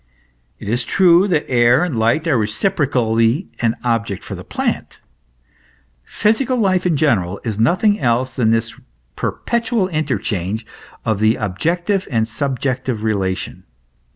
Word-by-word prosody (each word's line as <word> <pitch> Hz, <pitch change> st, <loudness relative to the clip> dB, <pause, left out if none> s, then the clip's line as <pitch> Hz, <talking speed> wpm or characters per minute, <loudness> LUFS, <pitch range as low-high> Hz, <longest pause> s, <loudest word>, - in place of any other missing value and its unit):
It -, -, -10 dB
is 120 Hz, +4 st, 0 dB
true 180 Hz, +6 st, +4 dB
that 160 Hz, -6 st, 0 dB
air 120 Hz, +4 st, +4 dB
and 175 Hz, -7 st, -2 dB
light 115 Hz, +9 st, +1 dB
are 150 Hz, -, +3 dB
reciprocally 115 Hz, -, +1 dB
an 115 Hz, -1 st, +1 dB
object 115 Hz, -5 st, -1 dB
for -, -, -7 dB
the -, -, -7 dB
plant. -, -, -3 dB, 1.0 s
Physical 235 Hz, -, 0 dB
life, 185 Hz, -5 st, +2 dB
in 165 Hz, -4 st, +1 dB
general, 100 Hz, -, +1 dB
is 110 Hz, -2 st, -3 dB
nothing 185 Hz, -, +3 dB
else 125 Hz, +1 st, 0 dB
than 115 Hz, -3 st, +2 dB
this 115 Hz, 0 st, 0 dB, 0.4 s
perpetual 235 Hz, -4 st, -1 dB
interchange 110 Hz, -, -2 dB, 0.4 s
of 110 Hz, -3 st, 0 dB
the 110 Hz, +2 st, +3 dB
objective 170 Hz, -, -1 dB
and 115 Hz, -4 st, 0 dB
subjective 130 Hz, -1 st, -2 dB
relation. 95 Hz, -4 st, -2 dB
125 Hz, 130 wpm, -18 LUFS, 110-170 Hz, 1.0 s, true